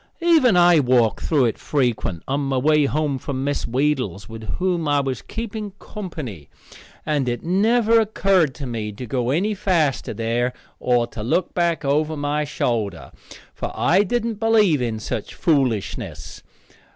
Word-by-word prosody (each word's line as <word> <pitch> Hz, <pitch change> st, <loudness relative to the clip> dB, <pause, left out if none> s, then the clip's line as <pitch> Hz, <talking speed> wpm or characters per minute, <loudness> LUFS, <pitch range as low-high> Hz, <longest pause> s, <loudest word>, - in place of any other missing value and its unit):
Even 305 Hz, -, +5 dB
I 175 Hz, -2 st, +6 dB
walked 125 Hz, -5 st, +2 dB
through 145 Hz, -6 st, +2 dB
it 115 Hz, -, -1 dB
frequent 120 Hz, -, -1 dB
on 140 Hz, +1 st, 0 dB
my 135 Hz, -1 st, -1 dB
way 150 Hz, +2 st, +3 dB
home 145 Hz, -1 st, -1 dB
from 135 Hz, 0 st, -4 dB
Miss 145 Hz, +1 st, -1 dB
Wheedle's, 125 Hz, -6 st, -1 dB
with 110 Hz, -2 st, -7 dB
whom 180 Hz, -3 st, -1 dB
I 145 Hz, -1 st, +3 dB
was 135 Hz, -3 st, -2 dB
keeping 215 Hz, -3 st, -6 dB
company, 150 Hz, -, -8 dB, 0.6 s
and 145 Hz, -4 st, 0 dB
it 120 Hz, -1 st, -3 dB
never 225 Hz, +6 st, +3 dB
occurred 195 Hz, -8 st, +2 dB
to 140 Hz, -, -6 dB
me 110 Hz, -4 st, -4 dB
to 125 Hz, +5 st, -7 dB
go 125 Hz, +1 st, -1 dB
any 185 Hz, +10 st, +1 dB
faster 170 Hz, -8 st, 0 dB
there, 120 Hz, +2 st, -1 dB, 0.3 s
or 120 Hz, -1 st, +2 dB
to 115 Hz, -, -8 dB
look 150 Hz, +11 st, 0 dB
back 170 Hz, -3 st, 0 dB
over 150 Hz, +3 st, +1 dB
my 145 Hz, +1 st, -1 dB
shoulder, 110 Hz, -, -2 dB, 0.4 s
for -, -, -5 dB
I 185 Hz, +4 st, +3 dB
didn't 225 Hz, +1 st, -1 dB
believe 215 Hz, -, +3 dB
in 115 Hz, -3 st, -1 dB
such 110 Hz, -1 st, -5 dB
foolishness. 135 Hz, -, -1 dB
145 Hz, 155 wpm, -22 LUFS, 120-180 Hz, 0.6 s, I